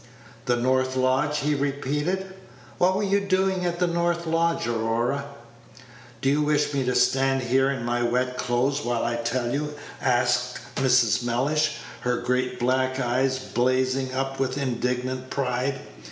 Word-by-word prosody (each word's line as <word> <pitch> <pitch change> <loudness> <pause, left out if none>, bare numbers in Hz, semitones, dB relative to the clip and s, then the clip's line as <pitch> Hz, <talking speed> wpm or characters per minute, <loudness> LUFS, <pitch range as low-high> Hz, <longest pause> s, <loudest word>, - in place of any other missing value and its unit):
"The 120 - +3
north 130 +1 +1
lodge!" 130 +3 +1
he 150 +2 +1
repeated; 145 +7 -2 0.5
"what 185 +1 +4
were 205 - 0
you 200 0 +2
doing 190 -1 +1
at 175 0 -2
the 180 - +2
north 170 0 0
lodge, 165 -1 +1
Aurora?" 120 +4 0 1.0
"Do 135 - +3
you 150 +1 +2
wish 150 0 +1
me 140 -1 +1
to 125 - 0
stand 135 +1 +2
here 135 +2 +2
in 130 -4 -3
my 120 0 0
wet 125 +1 0
clothes 125 +3 0
while 120 -1 -1
I 120 0 -1
tell 120 +1 -1
you?" 150 +1 -2 0.3
asked 125 0 +1 0.2
Mrs. 125 -3 +3
Mellish, 145 +6 +1 0.2
her 125 0 0
great 125 0 -1
black 130 +1 +1
eyes 130 +1 +1
blazing 130 +1 0
up 135 0 -2
with 130 0 -1
indignant 125 0 -2
pride. 135 0 -1
130 Hz, 155 wpm, -25 LUFS, 125-145 Hz, 1.0 s, what